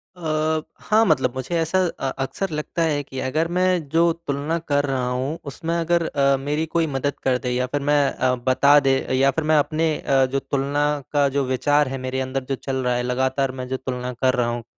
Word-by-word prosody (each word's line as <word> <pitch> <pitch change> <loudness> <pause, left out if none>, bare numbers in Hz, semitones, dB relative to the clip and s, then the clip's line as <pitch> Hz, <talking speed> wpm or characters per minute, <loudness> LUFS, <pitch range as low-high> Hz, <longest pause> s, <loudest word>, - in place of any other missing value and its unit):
अ, 155 -2 -1 0.2
हाँ, 220 +1 +3
मतलब 130 - +1
मुझे 130 +6 -3
ऐसा 165 +3 +1 0.2
अ, 135 - -1
अक़्सर 140 +8 -3
लगता 150 +2 -3
है 150 -3 +1
कि 130 -1 -8
अगर 155 +6 0
मैं 180 -4 +1
जो 165 +3 +3 0.2
तुलना 145 +4 -1
कर 145 -3 0
रहा 130 -3 -1
हूँ 130 +5 -2
उसमें 165 +4 -3
अगर 170 0 +1
अ, 140 -1 +2
मेरी 145 +4 -2
कोई 165 0 0
मदद 140 0 -2
कर 130 -1 +2
दे 125 - -3
या 125 +1 0
फिर 145 +3 -2
मैं 145 -1 +4
अ, 130 0 +1
बता 140 +3 +6
दे 135 -1 +2 0.2
या 135 +1 +4
फिर 160 +4 -2
मैं 155 0 +3
अपने 155 +1 0
अ, 135 -1 +2
जो 135 - +1
तुलना 140 +2 -1 0.3
का 145 -1 +4
जो 140 - +2
विचार 140 +3 +2
है 135 +1 -4
मेरे 130 +1 -2
अंदर 130 0 -3
जो 135 - 0
चल 135 +1 -5
रहा 125 -1 +1
है 120 - -1
लगातार 130 +2 0
मैं 125 - -4
जो 130 +1 -2
तुलना 125 -1 -4
कर 130 +1 +1
रहा 120 -1 +1
हूँ, 120 0 -4
140 Hz, 225 wpm, -22 LUFS, 130-155 Hz, 0.3 s, बता